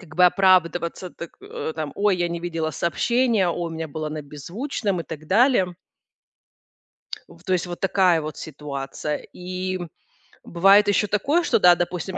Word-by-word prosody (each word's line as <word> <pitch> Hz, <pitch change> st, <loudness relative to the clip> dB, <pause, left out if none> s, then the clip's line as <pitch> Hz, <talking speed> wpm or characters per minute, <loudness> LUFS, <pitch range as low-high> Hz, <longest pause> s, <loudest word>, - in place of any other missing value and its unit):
как 155 Hz, -5 st, -14 dB
бы 180 Hz, -, +6 dB
оправдываться, 180 Hz, -1 st, +2 dB
так, 170 Hz, -, -9 dB
э, 160 Hz, -, -5 dB
там: 155 Hz, -2 st, -4 dB
"Ой, 200 Hz, -2 st, +2 dB
я 175 Hz, -1 st, 0 dB
не 170 Hz, 0 st, -4 dB
видела 165 Hz, -2 st, -2 dB
сообщение, 225 Hz, -, +1 dB
ой, 170 Hz, 0 st, -2 dB
у 165 Hz, -, -7 dB
меня 160 Hz, 0 st, -5 dB
было 155 Hz, +1 st, -4 dB
на 155 Hz, 0 st, -5 dB
беззвучном" 180 Hz, -, -4 dB
и -, -, -6 dB
так 155 Hz, -1 st, -9 dB
далее. 195 Hz, -, +3 dB, 1.5 s
В -, -, -18 dB
то 185 Hz, -, -1 dB
есть 180 Hz, 0 st, 0 dB
вот 175 Hz, -, -6 dB
такая 185 Hz, -4 st, +3 dB
вот 155 Hz, 0 st, -6 dB
ситуация. 150 Hz, -1 st, -5 dB, 0.2 s
И 185 Hz, +1 st, -4 dB, 0.6 s
бывает 195 Hz, +4 st, +5 dB
ещё 210 Hz, +1 st, +2 dB
такое, 280 Hz, -, +1 dB
что -, -, +2 dB
да, 180 Hz, -2 st, +7 dB
допустим, 180 Hz, +2 st, -3 dB
175 Hz, 170 wpm, -23 LUFS, 160-195 Hz, 1.5 s, да